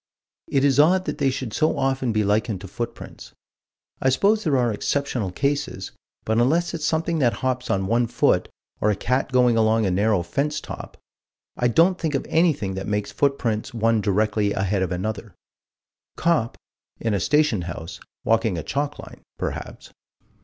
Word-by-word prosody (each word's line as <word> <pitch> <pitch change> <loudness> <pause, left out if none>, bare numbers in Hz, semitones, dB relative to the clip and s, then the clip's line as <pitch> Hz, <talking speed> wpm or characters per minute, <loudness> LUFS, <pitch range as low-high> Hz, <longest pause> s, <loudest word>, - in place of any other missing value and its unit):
It 135 -1 +1
is 140 -1 +3
odd 180 +5 +4
that - - -4
they 140 -2 +3
should 130 -4 -4
so 155 -1 +1
often 135 -2 0
be 110 -1 +1
likened 105 0 0
to 100 - -8
footprints: 120 +5 -7 0.7
I 130 - +3
suppose 205 +11 +2
there 145 -5 +2
are 120 -3 +1
exceptional 125 -4 -1
cases, 140 -4 -2 0.3
but 110 +1 +1
unless 160 +8 +2
it's 160 -2 -3
something 160 +1 0
that 120 -4 +3
hops 130 -1 -1
on 95 0 +1
one 115 +4 +2
foot, - - +1 0.3
or 105 - +2
a 105 - +2
cat 130 +7 -1
going 125 -2 +4
along 110 0 +3
a 95 - +1
narrow 100 0 +2
fence 150 - -1
top, - - -9 0.6
I 125 - +1
don't 170 +9 +3
think 155 -3 -1
of 135 - -1
anything 155 - +2
that 95 0 -5
makes 105 0 -2
footprints 125 -4 -1
one 115 -1 +2
directly 105 0 +1
ahead 95 0 0
of 95 -1 -1
another 100 +1 -4 0.8
Cop, 155 -9 +1 0.4
in 115 -2 -1
a 100 - +1
station 150 - +2
house, 85 -1 -7 0.2
walking 110 -4 +1
a 80 - -4
chalk 145 +1 -2
line, - - -11 0.2
perhaps. - - -6
120 Hz, 175 wpm, -23 LUFS, 105-145 Hz, 0.8 s, odd